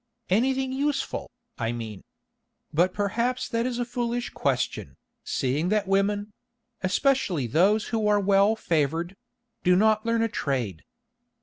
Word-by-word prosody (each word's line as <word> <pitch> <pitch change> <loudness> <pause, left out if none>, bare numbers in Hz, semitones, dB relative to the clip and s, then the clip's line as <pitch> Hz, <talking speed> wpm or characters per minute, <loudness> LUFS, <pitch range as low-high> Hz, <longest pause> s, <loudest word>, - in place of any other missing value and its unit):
"Anything 260 +5 +2
useful, 285 +2 -2 0.3
I 115 -1 0
mean? 110 -4 -6 0.7
But 175 +4 +3
perhaps 235 +6 -1
that 230 +1 -1
is 245 -2 -3
a 245 - -1
foolish 240 0 -2
question, - - -2 0.3
seeing 145 +6 -1
that 210 -1 +1
women—especially 205 - -1
those 195 - +2
who 220 -2 0
are 210 0 +4
well 200 +2 +4
favoured—do 180 - -1
not 215 +2 +3
learn 230 0 +1
a - - +2
trade." 125 - -2
205 Hz, 120 wpm, -26 LUFS, 175-235 Hz, 0.7 s, are